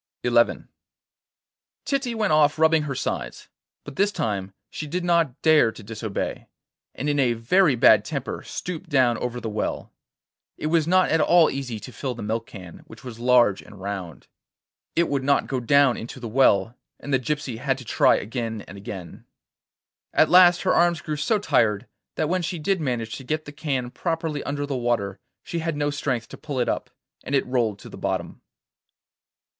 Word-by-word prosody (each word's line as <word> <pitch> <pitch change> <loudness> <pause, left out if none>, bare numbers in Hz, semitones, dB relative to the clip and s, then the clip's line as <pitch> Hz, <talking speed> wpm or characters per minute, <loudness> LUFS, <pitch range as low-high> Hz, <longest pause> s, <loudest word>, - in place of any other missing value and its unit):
XI - - +1 1.5
Titty 270 -4 -1
went 210 -7 +1
off 150 -1 +4
rubbing 160 0 +4
her 145 -3 -4
sides; - - -4 0.3
but 145 - -10
this 200 +1 +3
time 100 - -3 0.2
she 155 - -6
did 180 +4 -3
not 165 -6 +1
dare 155 -8 +5
to 110 - -12
disobey, 110 -1 -5 0.5
and 145 - -4
in 145 -1 +1
a 125 -3 +3
very 140 +7 +3
bad 110 -3 +6
temper 140 -2 -4
stooped 170 -2 -6
down 130 -5 +3
over 125 0 -3
the 115 - -5
well. 105 -1 -3 0.6
It - - -6
was 165 -2 +3
not 185 +1 +3
at 160 0 +3
all 170 -2 +5
easy 130 -5 -4
to 130 - -9
fill 125 +2 -4
the 115 - -7
milk 110 +2 -2
can, 90 -4 -11
which 110 - -14
was 120 -3 -9
large 120 -5 +4
and 105 -2 -14
round. 95 -4 -6 0.7
It 170 0 +3
would 140 -2 -1
not 140 +1 +2
go 130 - -2
down 135 +1 +4
into 120 +3 -8
the 120 - -6
well, 115 -2 +3 0.2
and 145 - -5
the 135 - +4
gypsy 135 -3 -3
had 135 0 0
to 130 - -10
try - - +4
again 115 -1 -4
and 100 - -10
again. 95 -3 -9 0.9
At - - +5
last 180 -1 +7
her 185 - +2
arms 170 -1 +3
grew 155 - -3
so 150 +9 +1
tired 105 - +1 0.3
that 155 - 0
when 185 +3 0
she 175 +1 -3
did 180 +3 0
manage 120 -5 -2
to 135 - -10
get 155 +4 -3
the 145 - -8
can 140 -5 -3
properly 165 -3 -2
under 145 0 -2
the 140 -1 -3
water 120 -6 -1 0.2
she 170 - -4
had 160 -2 -2
no 145 0 0
strength 130 -5 -2
to - - -10
pull 145 -4 -5
it 120 - +1
up, - - -2 0.3
and 140 - -2
it 135 - +2
rolled 120 -5 0
to - - -12
the - - -11
bottom. - - -3
135 Hz, 190 wpm, -24 LUFS, 115-155 Hz, 1.5 s, last